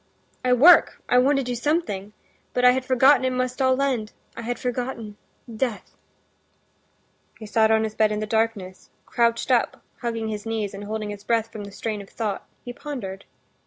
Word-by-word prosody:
"I 250 - +1
work, 310 +9 +6
I 250 - +4
want 275 +3 +3
to 275 - 0
do 250 0 -3
something, 230 - -2 0.4
but 250 - +2
I 250 - +9
had 260 +1 -1
forgotten 260 +2 +4
it 260 - +2
must 255 +1 -2
all 260 0 +3
end; 255 -6 -1 0.2
I 230 - -6
had 240 +1 -3
forgotten—death." 235 -2 -5 1.4
He 220 - -9
sat 220 +1 +3
on 220 0 +3
his 220 -1 -3
bed 215 -1 +2
in 210 - -1
the 215 - -2
darkness, 215 -4 -2 0.2
crouched 235 +1 +1
up, 245 -2 +1 0.2
hugging 230 -2 -3
his 210 -1 -4
knees, 220 -3 -3
and 200 +1 -7
holding 215 0 -4
his 205 0 -9
breath 225 0 0
from 210 -2 -7
the 200 - -10
strain 215 0 -4
of 195 - -13
thought, 210 -4 -4 0.2
he 245 - -6
pondered. 215 -10 -7
230 Hz, 185 wpm, -24 LUFS, 215-250 Hz, 1.4 s, I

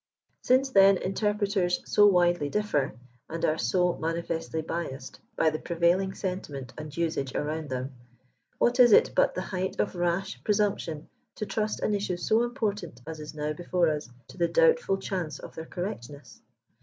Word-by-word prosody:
Since, 265 +2 +3
then, 195 -2 +6
interpreters 200 -2 0
so 205 -1 +5
widely 175 -5 +3
differ, 145 - 0 0.3
and 165 +1 -2
are 155 +1 +1
so 175 +9 +2
mani 165 +1 -2
festly 160 -1 -3
biassed 135 -6 -5 0.2
by 160 - +3
the 155 - -3
prevailing 175 +3 +1
sentiment 145 -9 -5
and 155 0 -8
usage 155 -5 -1
around 155 0 -2
them, 130 +1 -4 0.6
what 245 +2 +2
is 240 -3 +8
it - - +6
but - - +3
the 185 - -2
height 185 -1 -3
of - - 0
rash 175 +2 -2
presumption 200 -7 0 0.3
to 210 - -4
trust 215 0 -2
an 210 - +1
issue 200 -3 -1
so 220 +5 +2
important 210 - -3
as 160 0 -7
is 150 0 -8
now 150 0 -2
before 175 +1 +1
us, 150 -4 -3 0.2
to - - -13
the 170 - +3
doubtful 485 - +3
chance 180 -6 -4
of - - -10
their 160 0 -8
correctness? 145 - -7
175 Hz, 170 wpm, -28 LUFS, 155-200 Hz, 0.6 s, is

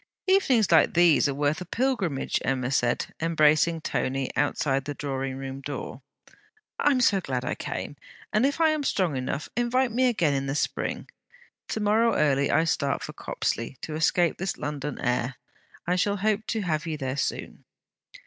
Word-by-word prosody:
'Evenings 275 - +3
like 165 - +5
these 170 -4 +5
are - - -1
worth 145 +3 0
a - - -5
pilgrimage,' 200 - -1
Emma 130 -1 -1
said, 120 -3 0
embracing 160 0 +3
Tony 135 -3 -2
outside 135 -2 0
the 145 0 -4
drawing 135 -2 -3
room 135 0 -6
door. 140 -2 -6 0.8
'I 290 - +4
am 255 - +1
so 200 -5 +3
glad 130 -6 -3
I - - -1
came: - - -5 0.4
and 215 - +3
if 280 +3 +1
I 325 -1 +5
am 310 -1 0
strong 185 - 0
enough, 130 +3 -3
invite 245 +1 +1
me 255 +3 +2
again 175 - +2
in 135 0 -1
the 135 - -2
Spring. - - -2 0.6
To - - -3
morrow 220 +2 +3
early 140 -2 +2
I 160 - +3
start 140 -4 0
for - - -6
Copsley, 115 +3 -3
to 155 - -5
escape 165 +2 +2
this 190 +1 -2
London 145 -1 -4
air. 125 +1 -1 0.5
I 180 +1 +1
shall 200 +2 +1
hope 215 +2 0
to 225 - -1
have 160 -3 -2
you 155 -2 -2
there 130 -2 -3
soon.' 140 - -3
155 Hz, 175 wpm, -26 LUFS, 135-210 Hz, 0.8 s, like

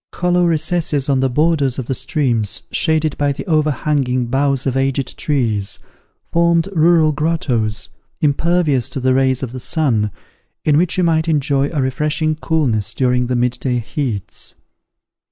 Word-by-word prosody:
Hollow 180 0 +2
recesses 155 -3 0
on 135 -1 +2
the 135 0 +1
borders 145 -1 +1
of 130 - -3
the 130 - -2
streams 120 - -1
shaded 160 -2 +1
by 145 -1 +2
the 140 - -6
overhanging 150 -6 0
boughs 135 +1 0
of 135 -2 -1
aged 135 0 -1
trees, 115 -9 -1 0.5
formed 170 0 +2
rural 165 -1 +4
grottoes, 140 -9 -1 0.3
impervious 150 -3 +1
to - - -4
the 130 0 +2
rays 130 0 +1
of 125 - -4
the 130 - -6
sun, 120 -8 0 0.6
in 150 - +3
which 175 +4 +2
you 185 - +2
might 160 -1 +1
enjoy 140 -2 +1
a 145 -5 -1
refreshing 150 +4 0
coolness 145 - 0
during 125 -1 +1
the 125 - -1
mid 125 0 0
day 125 -2 0
heats. 115 - -5
140 Hz, 155 wpm, -18 LUFS, 125-160 Hz, 0.6 s, rural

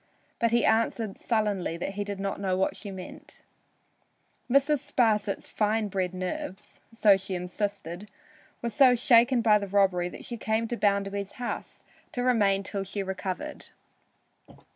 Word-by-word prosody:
But 230 - +3
he 235 +1 +2
answered 225 -2 +1
sullenly 205 -7 0
that 175 - -3
he 205 +1 -2
did 200 -1 -5
not 195 0 -3
know 185 -2 0
what 190 - 0
she 205 - -8
meant. 190 -2 -10 1.1
Mrs. 280 +3 +3
Sparsit's 220 -6 0
fine 215 0 0
bred 185 -2 -1
nerves 185 +1 -5
(so 215 -3 +5
she 190 0 -5
insisted) 190 +1 -4 0.5
were 235 - -1
so 250 +2 +6
shaken 240 0 +4
by 210 -2 +5
the 200 - -4
robbery 190 -3 +2
that - - -10
she 240 - -5
came 220 +1 0
to 240 - -1
Bounderby's 200 -2 0
house 245 -1 -6 0.3
to 245 - -2
remain 205 -6 +3
till 195 0 -4
she 195 +1 -4
recovered. 190 +10 -5
205 Hz, 150 wpm, -28 LUFS, 195-230 Hz, 1.1 s, so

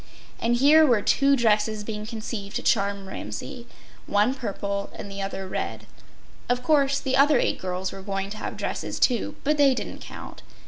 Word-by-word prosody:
And 235 +1 +2
here 295 +5 +6
were 240 -8 +3
two 275 0 +4
dresses 215 -3 +2
being 210 0 -5
conceived 215 -3 -6
to - - -2
charm 200 -2 +1
Ramsay—one 205 - -3
purple 200 -5 -3
and 200 - -8
the 195 0 -5
other 195 -1 -4
red. - - -4 0.6
Of 245 0 +1
course, 280 -1 +3
the 265 -2 -1
other 280 +1 +5
eight - - 0
girls 185 0 -3
were 195 - -8
going 195 0 -3
to 215 - -6
have - - -5
dresses - - -3
too, 245 -3 +1
but 300 +2 +2
they 275 -2 +5
didn’t - - -5
count. - - -10
220 Hz, 175 wpm, -25 LUFS, 200-265 Hz, 0.6 s, here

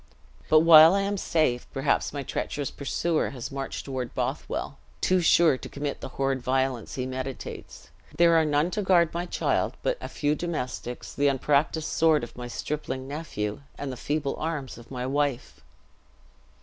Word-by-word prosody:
But, 155 0 +7
while 165 +1 +9
I 200 - +2
am 200 +1 -1
safe, 155 -10 0
perhaps 135 +2 0
my 140 -1 -4
treacherous 140 +1 -3
pursuer 155 +3 -1
has 130 -1 -7
marched 135 0 -5
toward 130 -3 -4
Bothwell, - - -3 0.2
too 185 -1 +2
sure 165 -5 +4
to - - -8
commit 145 0 -4
the - - -6
horrid 135 -1 0
violence 130 -2 -1
he 130 - -2
meditates; 130 0 -7 0.3
there 170 0 +5
are 160 - +5
none 150 +3 +1
to 210 - -1
guard 175 -4 +3
my 175 +1 -3
child - - 0
but - - 0
a - - -5
few 145 0 0
domestics, 150 -7 -4
the 145 - +2
unpracticed 140 +3 +1
sword 160 -3 +3
of 120 - -8
my 125 0 -6
stripling 135 0 -4
nephew, 140 -8 -4 0.2
and 140 -1 -4
the - - -5
feeble 145 +2 -2
arms 150 -5 -3
of 120 - -15
my 125 -2 -4
wife." 140 -1 -1
145 Hz, 170 wpm, -26 LUFS, 130-160 Hz, 0.3 s, while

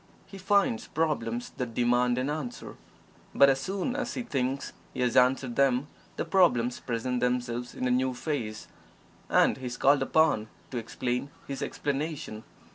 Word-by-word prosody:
He 195 - -11
finds 195 - +2
problems 120 -7 -1
that 120 -3 -4
demand 120 0 +2
an 130 +1 0
answer, 145 -5 -5 0.6
but 140 - +7
as 135 - 0
soon 195 - -2
as - - -3
he 250 - -2
thinks 135 - -2 0.2
he - - -2
has 125 -1 +1
answered 125 -1 +3
them 135 -1 +3 0.3
the - - -1
problems 125 -11 +3
present 125 +1 -2
themselves 125 0 -1
in 130 - -1
a - - +1
new 130 0 +1
phase, 120 -7 -4 0.6
and - - +4
he 130 -1 -5
is 125 0 -5
called 140 +1 +4
upon 150 -9 +3 0.2
to 125 - -2
"explain 125 +3 -3 0.2
his 135 -1 -5
explanation." 145 -6 -3
125 Hz, 160 wpm, -28 LUFS, 120-145 Hz, 0.6 s, but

